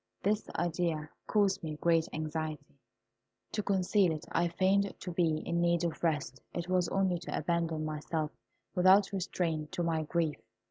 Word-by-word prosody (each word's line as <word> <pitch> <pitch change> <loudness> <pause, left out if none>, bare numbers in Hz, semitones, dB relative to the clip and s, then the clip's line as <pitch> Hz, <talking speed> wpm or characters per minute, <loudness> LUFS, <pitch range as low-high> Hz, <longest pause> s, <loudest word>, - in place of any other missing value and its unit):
This 210 +2 +1
idea 165 -3 -1 0.2
caused 200 -2 +2
me 155 -3 -4
great 165 +1 +2
anxiety. 155 -2 -4 0.7
To 210 - -1
conceal 195 -1 +2
it, 155 -1 -4
I 175 - +2
feigned 190 +3 +2
to 180 - -5
be 165 -3 +2
in 170 0 0
need 170 0 +2
of 170 -2 -2
rest, 145 -5 0
it 175 0 -3
was 185 -1 +2
only 190 -3 +1
to 170 - -4
abandon 165 -2 0
myself 155 0 -2 0.4
without 190 +2 +5
restraint 170 -5 -1
to 175 - -1
my 165 -1 +1
grief. 160 -1 -1
170 Hz, 155 wpm, -32 LUFS, 155-185 Hz, 0.7 s, without